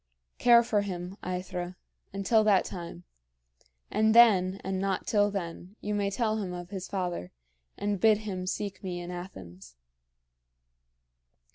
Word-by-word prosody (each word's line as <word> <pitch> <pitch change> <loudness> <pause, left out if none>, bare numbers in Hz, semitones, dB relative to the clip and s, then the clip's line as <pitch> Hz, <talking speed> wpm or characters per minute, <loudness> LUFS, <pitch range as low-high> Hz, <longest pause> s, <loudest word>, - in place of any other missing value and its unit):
Care 235 -1 +7
for 215 -3 +1
him, 180 -2 -5
AEthra, 180 0 -4 0.4
until 200 +3 +2
that 205 -3 +4
time; 170 - -7 0.9
and 220 +1 +3
then, 195 -5 +6
and 190 0 -2
not 195 -1 -1
till 205 -1 +3
then, 185 0 -6
you 210 - -3
may 200 -1 0
tell 220 +1 0
him 185 -3 -4
of 175 +1 -7
his 190 -2 -5
father, 180 - -3 0.5
and 205 -1 -1
bid 220 -1 +6
him 190 -4 -5
seek 200 +1 -3
me 180 -2 -4
in 175 0 -6
Athens." 95 - -9
190 Hz, 140 wpm, -29 LUFS, 180-205 Hz, 0.9 s, Care